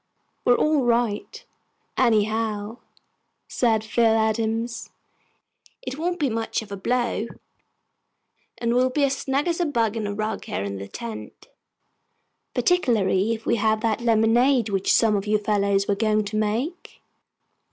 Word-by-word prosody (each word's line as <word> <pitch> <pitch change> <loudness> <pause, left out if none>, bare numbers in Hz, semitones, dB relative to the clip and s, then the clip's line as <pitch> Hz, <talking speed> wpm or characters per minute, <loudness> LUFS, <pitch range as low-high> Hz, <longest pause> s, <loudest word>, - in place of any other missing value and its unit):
"We're 245 - +5
all 305 -2 +2
right, 235 -3 -1 0.5
anyhow," 220 -1 0 0.7
said 225 -3 +1
Phil 225 0 +2
Adams. 225 +1 -1 0.9
"It 280 - -6
won't 350 +2 -1
be 290 - +2
much 225 -1 -2
of 205 - -15
a - - -3
blow, 235 +2 -1 1.3
and 235 0 0
we'll 255 +1 +3
be 285 +3 0
as 275 -1 +2
snug 275 +3 -1
as 340 0 0
a 350 - +2
bug 230 -6 0
in 220 -2 -2
a 205 - -3
rug, 215 +1 -3
here 95 - -3
in 100 0 -4
the 100 +1 -7
tent, 230 - -8 1.1
particularly 225 - +2
if 220 - -12
we - - +2
have 215 0 +1
that 225 0 0
lemonade 235 +2 +3
which 195 -1 0
some 220 -2 +4
of 200 +1 -2
you 215 0 +3
fellows 200 -1 +1
were 205 - +2
going 215 +1 +1
to 205 +1 -5
make." 220 +11 -3
225 Hz, 150 wpm, -24 LUFS, 210-245 Hz, 1.3 s, We're